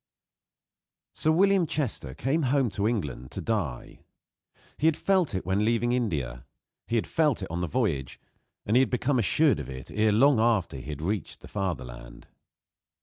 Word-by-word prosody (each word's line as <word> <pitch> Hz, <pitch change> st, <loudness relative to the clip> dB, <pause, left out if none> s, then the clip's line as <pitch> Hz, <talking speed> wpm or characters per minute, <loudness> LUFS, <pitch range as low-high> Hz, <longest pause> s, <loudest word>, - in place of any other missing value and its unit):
Sir 155 Hz, -, +2 dB
William 190 Hz, +1 st, +3 dB
Chester 110 Hz, -, -3 dB
came 135 Hz, -, 0 dB
home 135 Hz, -4 st, +1 dB
to 100 Hz, +1 st, -1 dB
England 75 Hz, -, -3 dB
to -, -, -5 dB
die. 90 Hz, -, -3 dB, 0.8 s
He 155 Hz, -, +3 dB
had 160 Hz, -, +3 dB
felt 185 Hz, -, +1 dB
it 95 Hz, -, -3 dB
when 95 Hz, +3 st, +1 dB
leaving 120 Hz, +2 st, +1 dB
India; 75 Hz, -, -2 dB, 0.4 s
he 115 Hz, -, -1 dB
had 115 Hz, -, +1 dB
felt 150 Hz, -, +1 dB
it 95 Hz, -, -6 dB
on 85 Hz, -, -2 dB
the 90 Hz, -, -1 dB
voyage, 80 Hz, -, -1 dB, 0.5 s
and 110 Hz, -, +1 dB
he -, -, +7 dB
had 130 Hz, -, +3 dB
become 125 Hz, +1 st, +1 dB
assured 130 Hz, -, +3 dB
of 70 Hz, -, -6 dB
it 65 Hz, 0 st, -8 dB
ere 110 Hz, 0 st, +2 dB
long 130 Hz, +4 st, +4 dB
after 110 Hz, -, +1 dB
he 65 Hz, +3 st, -9 dB
had 75 Hz, 0 st, -5 dB
reached 100 Hz, +2 st, -3 dB
the -, -, -11 dB
fatherland. 60 Hz, -11 st, -5 dB
110 Hz, 175 wpm, -27 LUFS, -, 0.8 s, he